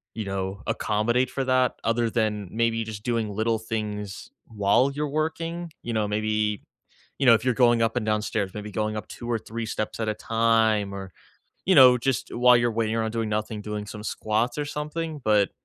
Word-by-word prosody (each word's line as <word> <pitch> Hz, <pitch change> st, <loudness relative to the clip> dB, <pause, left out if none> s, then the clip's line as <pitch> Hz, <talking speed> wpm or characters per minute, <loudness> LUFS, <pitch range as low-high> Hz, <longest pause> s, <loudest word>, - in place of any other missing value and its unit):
you 110 Hz, -1 st, -4 dB
know, 95 Hz, 0 st, -4 dB
accommodate 120 Hz, +4 st, +1 dB
for 135 Hz, -, -2 dB
that 130 Hz, -1 st, +2 dB
other 115 Hz, 0 st, +1 dB
than 105 Hz, -4 st, -1 dB
maybe 115 Hz, 0 st, +1 dB
just 110 Hz, -2 st, -7 dB
doing 115 Hz, -3 st, -1 dB
little 110 Hz, +2 st, 0 dB
things 105 Hz, -2 st, -5 dB, 0.2 s
while 110 Hz, +5 st, +2 dB
you're 150 Hz, +1 st, -3 dB
working. 165 Hz, +1 st, -4 dB
You 120 Hz, -, -3 dB
know, 110 Hz, -1 st, +1 dB
maybe, 105 Hz, 0 st, -1 dB, 0.5 s
you 140 Hz, -, 0 dB
know, 120 Hz, -, +8 dB
if 115 Hz, 0 st, +2 dB
you're 125 Hz, -, +2 dB
going 120 Hz, -1 st, +3 dB
up 115 Hz, +1 st, +1 dB
and 115 Hz, -, -1 dB
down 105 Hz, -1 st, +1 dB
stairs, 100 Hz, -3 st, -2 dB
maybe 105 Hz, 0 st, -6 dB
going 110 Hz, +1 st, -2 dB
up 105 Hz, -, -5 dB
2 120 Hz, -, -8 dB
or 115 Hz, -, +1 dB
3 115 Hz, +1 st, -5 dB
steps 110 Hz, 0 st, -4 dB
at 110 Hz, -, -1 dB
a -, -, 0 dB
time 110 Hz, -2 st, +2 dB
or, 95 Hz, -1 st, -7 dB, 0.6 s
you 190 Hz, -, +5 dB
know, 125 Hz, -4 st, +8 dB
just 130 Hz, 0 st, -1 dB
while 125 Hz, 0 st, +6 dB
you're 120 Hz, 0 st, +1 dB
waiting 110 Hz, 0 st, 0 dB
around 110 Hz, -1 st, -1 dB
doing 115 Hz, -1 st, -1 dB
nothing, 105 Hz, 0 st, -2 dB
doing 105 Hz, 0 st, -5 dB
some 105 Hz, +1 st, -8 dB
squats 110 Hz, +3 st, -1 dB
or 145 Hz, -, 0 dB
something, 150 Hz, +1 st, -4 dB
but 105 Hz, -3 st, +3 dB
110 Hz, 205 wpm, -25 LUFS, 105-120 Hz, 0.6 s, know